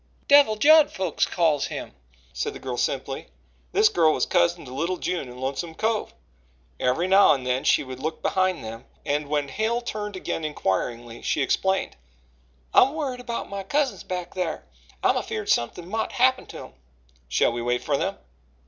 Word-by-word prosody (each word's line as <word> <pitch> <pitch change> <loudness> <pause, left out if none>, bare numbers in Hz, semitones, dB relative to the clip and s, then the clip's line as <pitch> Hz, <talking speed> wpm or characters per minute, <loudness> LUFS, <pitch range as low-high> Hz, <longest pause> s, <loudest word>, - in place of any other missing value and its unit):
Devil 285 -6 +6
Judd, 305 +6 +6
folks 185 -4 -1
calls 160 -5 +1
him," - - -6 0.4
said - - -3
the - - -9
girl 130 -2 -4
simply. 135 +2 -2 0.4
This 425 +1 +5
girl 160 - +3
was - - +1
cousin 170 -2 +1
to 125 - -9
little 170 +7 -1
June 175 -9 -3
in 125 - -11
Lonesome 140 +6 -4
Cove. 220 +2 -1 0.6
Every 130 +8 +1
now 195 -1 +6
and 130 -3 -4
then 125 +2 0
she - - +3
would 130 -1 -8
look 160 +4 -3
behind 185 -6 +1
them, 115 +1 -8 0.2
and 145 0 -1
when 145 -1 0
Hale 220 - 0
turned 210 -4 -5
again 180 -3 -4
inquiringly 120 -3 -2
she 145 - 0
explained: 190 +8 0 0.8
"I'm 270 +4 +5
worried 275 -5 -3
about 240 -2 -4
my 200 0 -5
cousins 275 +8 0
back 180 -1 -5
thar. 180 -4 -3 0.4
I'm - - +3
afeered - - -4
somethin' 170 +9 0
mought 220 +4 -2
happen 260 0 +2
to - - -9
'em." - - -10 0.6
"Shall - - +3
we 120 0 -4
wait 120 +1 -1
for - - 0
them?" - - -2
170 Hz, 175 wpm, -25 LUFS, 135-215 Hz, 0.8 s, Devil